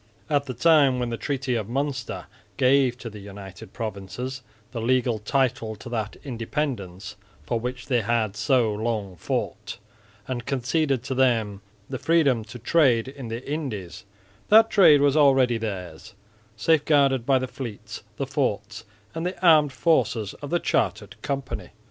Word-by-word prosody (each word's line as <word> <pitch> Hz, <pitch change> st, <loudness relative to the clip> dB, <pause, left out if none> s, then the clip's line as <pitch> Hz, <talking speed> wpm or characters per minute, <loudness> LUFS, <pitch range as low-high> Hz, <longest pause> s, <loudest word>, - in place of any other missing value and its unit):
At 145 Hz, -1 st, +1 dB
the 130 Hz, -, -5 dB
time 145 Hz, -2 st, +4 dB
when 120 Hz, -1 st, -2 dB
the -, -, -1 dB
Treaty 135 Hz, 0 st, -2 dB
of 110 Hz, -4 st, -2 dB
Münster 130 Hz, 0 st, -3 dB, 0.3 s
gave 130 Hz, -1 st, +3 dB
to 120 Hz, -, -8 dB
the 105 Hz, -2 st, -8 dB
United 100 Hz, -1 st, -10 dB
Provinces 115 Hz, +4 st, -5 dB, 0.3 s
the 115 Hz, -, -4 dB
legal 120 Hz, -1 st, +1 dB
title 125 Hz, 0 st, 0 dB
to 105 Hz, -, -10 dB
that 110 Hz, -3 st, -3 dB
independence 115 Hz, -7 st, -4 dB, 0.3 s
for 120 Hz, -, -1 dB
which 125 Hz, +1 st, -5 dB
they 125 Hz, -4 st, +1 dB
had 110 Hz, -2 st, 0 dB
so 120 Hz, -4 st, +2 dB
long 105 Hz, -3 st, -3 dB
fought, 85 Hz, -, -4 dB, 0.5 s
and 120 Hz, -3 st, -4 dB
conceded 135 Hz, 0 st, 0 dB
to 130 Hz, -, -3 dB
them 115 Hz, -6 st, +1 dB, 0.3 s
the 130 Hz, -2 st, -5 dB
freedom 145 Hz, -9 st, +2 dB
to 110 Hz, +3 st, -9 dB
trade 125 Hz, -2 st, +2 dB
in 135 Hz, -3 st, -8 dB
the 115 Hz, +3 st, -6 dB
Indies, 110 Hz, -, -5 dB, 0.5 s
that 225 Hz, +1 st, +7 dB
trade 160 Hz, -8 st, +7 dB
was 140 Hz, 0 st, +3 dB
already 135 Hz, -5 st, +4 dB
theirs, 100 Hz, -1 st, -6 dB, 0.4 s
safe 155 Hz, +6 st, +3 dB
guarded 140 Hz, -4 st, +3 dB
by 135 Hz, +2 st, +3 dB
the 130 Hz, 0 st, -2 dB
fleets, 105 Hz, -5 st, -7 dB, 0.2 s
the 140 Hz, -, -1 dB
forts 110 Hz, -7 st, -2 dB, 0.3 s
and 165 Hz, -, -4 dB
the 180 Hz, 0 st, -3 dB
armed 155 Hz, -4 st, +6 dB
forces 120 Hz, -, +1 dB
of 145 Hz, -, -6 dB
the 175 Hz, -, +2 dB
chartered -, -, -1 dB
company. 140 Hz, -2 st, -4 dB
125 Hz, 155 wpm, -25 LUFS, 110-140 Hz, 0.5 s, that